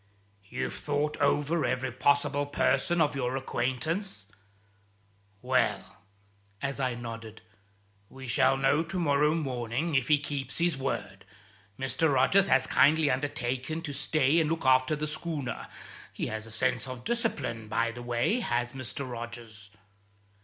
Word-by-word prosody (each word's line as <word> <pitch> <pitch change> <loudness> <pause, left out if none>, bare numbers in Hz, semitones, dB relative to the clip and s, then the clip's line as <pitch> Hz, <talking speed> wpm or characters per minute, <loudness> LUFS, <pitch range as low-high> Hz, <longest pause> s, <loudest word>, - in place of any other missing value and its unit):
"You've - - -3
thought 150 +1 -1
over 150 +3 +2
every 130 0 -1
possible 145 +2 +2
person 175 +4 +2
of 145 -2 +2
your 130 -1 -1
acquaintance? 130 - -2 1.2
Well" - - 0 0.6
as 140 +2 -3
I 130 -2 0
nodded 115 -2 -8 0.7
"we 135 0 -10
shall 135 +2 +3
know 135 +3 +3
to 165 +3 -3
morrow 150 -2 +3
morning, 130 +1 -2
if 135 -3 +2
he 150 - +5
keeps 140 -2 -4
his 170 -2 +2
word. 135 0 -4 0.5
Mr. 140 +4 +1
Rogers 180 +9 +4
has 130 - +4
kindly 150 +1 +4
undertaken 135 +2 -2
to 145 - -4
stay 145 +2 +2
and 155 -2 +2
look 165 -3 -2
after 130 +3 +4
the 150 +1 -3
schooner. 155 -3 -4 0.4
He - - -3
has 110 0 -5
a - - -10
sense 115 +3 0
of 130 -1 -7
discipline, 135 - -1
by 115 +2 0
the 120 +1 -8
way, 120 - +1
has 120 - -1
Mr. 130 +1 -5
Rogers." 115 -3 -7
135 Hz, 140 wpm, -29 LUFS, 125-150 Hz, 1.2 s, he